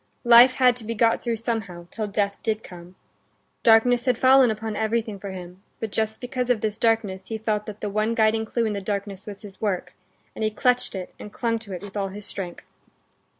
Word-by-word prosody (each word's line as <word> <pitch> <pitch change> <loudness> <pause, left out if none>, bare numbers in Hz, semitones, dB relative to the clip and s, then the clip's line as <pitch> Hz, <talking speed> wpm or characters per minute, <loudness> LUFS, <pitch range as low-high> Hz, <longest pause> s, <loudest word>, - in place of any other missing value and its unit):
Life 240 +2 +8
had 250 -2 +4
to 240 - -9
be 230 +1 -4
got 230 +1 +3
through 235 -1 -1
somehow 215 -7 -4
till 215 -2 -3
death 200 -1 -1
did 220 -1 -1
come. 175 0 -12 0.7
Darkness 240 +2 +5
had 250 -3 +2
fallen 260 0 +6
upon 220 0 -3
everything 220 -1 -1
for 200 - -6
him; 180 0 -9 0.2
but 220 -2 -4
just 220 0 -2
because 250 0 -3
of 240 -4 +2
this 215 0 -2
darkness 225 -5 0
he 225 - -3
felt 215 -1 -2
that 215 -1 -8
the 210 - -2
one 215 +2 0
guiding 220 -1 +3
clue 230 +1 -1
in 215 - -1
the 200 - -3
darkness 200 0 -4
was 200 0 -9
his 195 -2 -12
work, 185 -4 -2 0.4
and - - -5
he 215 - +2
clutched 250 +2 +1
it 185 -1 -6
and 210 - -9
clung 230 0 -1
to 215 -3 -12
it 180 - -6
with 205 0 -9
all 200 -1 -1
his 200 +1 -8
strength. 180 -4 -7
215 Hz, 220 wpm, -24 LUFS, 200-230 Hz, 0.7 s, Life